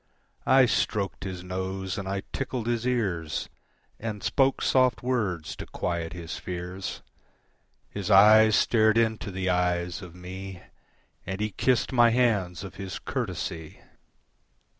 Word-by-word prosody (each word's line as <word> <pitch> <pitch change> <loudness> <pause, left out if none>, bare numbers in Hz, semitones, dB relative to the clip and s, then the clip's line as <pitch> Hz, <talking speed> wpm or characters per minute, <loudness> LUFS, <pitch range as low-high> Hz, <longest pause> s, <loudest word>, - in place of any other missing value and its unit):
I 130 0 +6
stroked 100 -5 -1
his 90 -2 -5
nose 95 +1 -4
and 100 -2 -5
I 100 0 -2
tickled 130 -4 -3
his 120 0 -1
ears, 95 -11 -1 0.5
And 105 -3 -5
spoke 135 +5 +2
soft 130 -2 +3
words 105 -11 -1
to - - -7
quiet 85 -1 -3
his 85 -2 -6
fears. 90 +1 -6 0.8
His 100 -1 -5
eyes 110 +2 +7
stared 110 0 +3
into 110 -2 +1
the 95 0 -3
eyes 90 0 0
of 90 -2 -11
me 95 +1 -8 0.6
And 95 +1 -5
he 105 0 -1
kissed 130 +6 +1
my 120 -2 +6
hands 105 -8 +1
of 95 - -9
his 95 -2 -5
courtesy. 80 -2 -4
95 Hz, 135 wpm, -27 LUFS, 90-115 Hz, 0.8 s, eyes